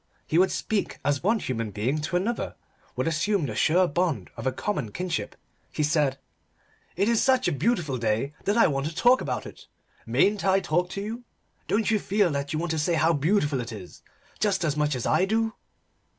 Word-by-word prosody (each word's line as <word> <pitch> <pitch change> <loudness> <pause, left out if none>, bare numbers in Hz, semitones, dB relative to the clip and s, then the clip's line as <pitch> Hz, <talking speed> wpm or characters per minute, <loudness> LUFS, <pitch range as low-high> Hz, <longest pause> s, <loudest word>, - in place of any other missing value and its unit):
He 160 - +2
would 190 +1 +4
speak 215 -2 -2
as 145 -1 +1
one 220 +6 +2
human 115 - -3
being 115 +9 -1
to 165 +4 -3
another 215 +7 -1 0.4
would - - -1
assume 165 +2 +1
the 115 - -4
sure 175 +10 +3
bond 170 -1 -1
of - - -4
a - - +2
common 130 - -3
kinship. 180 - -3 0.4
He 150 - -1
said 145 -3 +1 0.8
"It 200 +4 +1
is 230 -1 +3
such 260 -1 +3
a - - +2
beautiful 150 - 0
day 115 +5 0
that 205 +3 +1
I 230 - +6
want 140 -2 0
to 160 - -6
talk 245 +7 +4
about - - -3
it! - - -12 0.4
Mayn't 205 0 +2
I 195 0 +4
talk 180 0 0
to 200 - -3
you? 225 +4 -5 0.4
Don't 220 +2 +1
you 215 - +3
feel 200 -3 +1
that 140 0 -3
you 155 - -1
want 170 +1 -2
to 160 - -1
say 165 +3 +1
how 165 +1 +3
beautiful 145 -3 +1
it 120 +1 -6
is 100 -5 -10 0.4
just 200 -4 +1
as 150 -3 0
much 150 -2 +1
as 125 - -3
I 185 - +3
do?" 220 +2 0
165 Hz, 210 wpm, -26 LUFS, 145-205 Hz, 0.8 s, I